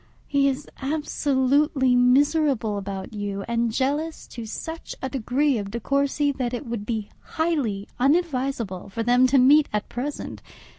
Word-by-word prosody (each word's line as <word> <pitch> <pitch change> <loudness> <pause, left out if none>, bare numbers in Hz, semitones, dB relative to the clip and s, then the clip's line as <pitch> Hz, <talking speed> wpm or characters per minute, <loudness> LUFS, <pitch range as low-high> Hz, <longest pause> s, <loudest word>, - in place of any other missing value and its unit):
He 280 -1 +2
is 275 +1 -2
absolutely 275 -2 +1
miserable 255 -2 +3
about 195 0 -6
you, 200 -1 -4
and 235 0 0
jealous 290 +7 -1
to 230 -2 -7
such 320 +8 -6
a 265 - -3
degree 265 +1 +1
of 200 -1 -5
De 235 +4 -4
Courcy 280 +3 +1
that 255 -3 -2
it 260 - -6
would 230 -3 -5
be 220 -3 -2 0.3
highly 275 -12 0
unadvisable 265 - 0
for 225 +3 -3
them 245 +2 +4
to 275 - +3
meet 280 +4 +6
at 210 0 -2
present. 275 +4 -5
260 Hz, 150 wpm, -24 LUFS, 230-285 Hz, 0.3 s, meet